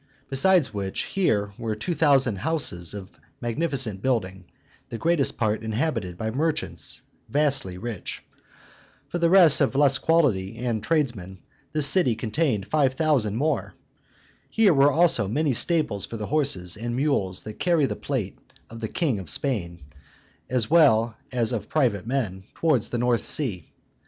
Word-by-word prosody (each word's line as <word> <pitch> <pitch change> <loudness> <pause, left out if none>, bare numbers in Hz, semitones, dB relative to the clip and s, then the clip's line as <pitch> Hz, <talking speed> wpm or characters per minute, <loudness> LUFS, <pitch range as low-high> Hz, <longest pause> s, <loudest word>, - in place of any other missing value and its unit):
Besides 145 -1 +3
which, 100 -2 -3
here 105 - -1
were 110 -2 -3
two 110 +12 -3
thousand 135 -9 +2
houses 105 - -2
of 100 -1 -9 0.3
magnificent 120 - -2
building, 95 -8 -2 0.4
the 115 - -5
greatest 165 0 +1
part 110 -2 -1
inhabited 110 - -3
by 110 +3 -3
merchants 155 +6 -3 0.3
vastly 140 -11 +1
rich. 110 -1 -6 0.9
For 175 - -3
the 170 0 +2
rest 175 -5 +6
of 135 -1 +1
less 140 -2 +4
quality, 115 - +1
and 120 -2 -2
tradesmen, 110 - -2 0.3
this 155 -2 +5
city 140 -6 +5
contained 115 - -1
five 135 -2 +1
thousand 130 -9 +1
more. 150 +6 -2 0.7
Here 220 -5 +3
were 140 0 +4
also 160 - +3
many 145 +6 0
stables 120 - +1
for 115 - -7
the 105 - -5
horses 115 - 0
and 120 +2 -4
mules 125 -10 -1
that 110 0 -9
carry 170 -5 +2
the - - -3
plate 120 -9 -4 0.3
of 115 - -9
the 110 - -3
king 135 - -1
of 90 -5 -3
Spain, 85 - -2 0.7
as 125 -3 0
well 120 -9 +4 0.2
as 120 -2 +1 0.2
private 115 -9 0
men, 105 -8 -3
towards 155 -9 +1
the 120 - -4
North 120 -1 0
Sea. 105 - 0
125 Hz, 150 wpm, -24 LUFS, 105-150 Hz, 0.9 s, rest